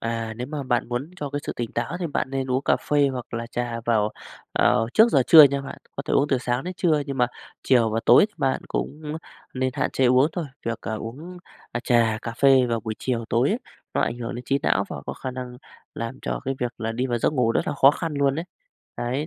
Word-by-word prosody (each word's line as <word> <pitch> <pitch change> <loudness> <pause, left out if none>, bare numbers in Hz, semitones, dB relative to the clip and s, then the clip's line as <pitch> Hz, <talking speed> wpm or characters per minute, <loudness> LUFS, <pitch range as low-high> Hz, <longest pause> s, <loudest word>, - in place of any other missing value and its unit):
À, 115 -1 -3
nếu 125 +1 -4
mà 145 -1 -4
bạn 125 -2 0
muốn 125 +7 -3
cho 145 -2 -5
cái 145 0 -3
sự - - -3
tỉnh 120 -2 -4
táo 120 - -2
thì 175 - -1
bạn 140 -3 -2
nên 135 -1 -2
uống 130 +2 +1
cà - - +3
phê 145 -1 +2
hoặc 125 -2 -6
là 115 0 -3
trà 120 -1 -3
vào, 110 -2 +2 0.4
ờ, 115 - +3
trước 225 +2 +6
giờ 135 - +4
trưa 160 -2 +10
nha 140 0 +2
bạn. 135 - -8 0.2
Có 140 - -3
thể - - -2
uống 145 +2 +3
từ 135 - +2
sáng 125 +2 -2
đến 180 0 -5
trưa 155 -5 +2
nhưng 135 -2 -4
mà 125 - +4 0.4
chiều 120 -4 +3
và 115 - 0
tối - - +7
thì 210 - -32
bạn 135 -1 0
cũng, 155 +2 -4
ơ, 160 - -4 0.4
nên 130 0 0
hạn - - 0
chế 130 - +1
uống 130 +3 +5
thôi. 175 - -3 0.2
Việc, 115 -1 -2
ờ, 110 - -4
uống, 155 +11 -8 0.3
à, - - -2
trà, 115 -4 +3
cà 115 - -4
phê 135 -2 +5
vào 115 -1 -1
buổi 110 0 -4
chiều 120 -3 -2
tối 120 +4 +2
ấy, 225 - 0 0.4
nó - - +1
ảnh 120 +1 -2
hưởng 115 -1 -4
đến 120 +1 -7
trí 140 0 +1
não 100 - +2
và - - -6
có - - -3
khả 130 - -6
năng 125 -1 -7 0.4
làm 115 +3 -5
cho - - -3
cái 135 +1 -1
việc 120 0 -1
là 115 0 -2
đi 125 +3 -1
vào 120 -2 -1
giấc 150 - +1
ngủ 120 -5 +2
rất - - 0
là - - 0
khó 135 0 +7
khăn 160 0 -4
luôn 140 0 +1
ấy. 165 - -3 0.5
Đấy, 130 +6 -2
130 Hz, 265 wpm, -24 LUFS, 115-140 Hz, 0.5 s, trưa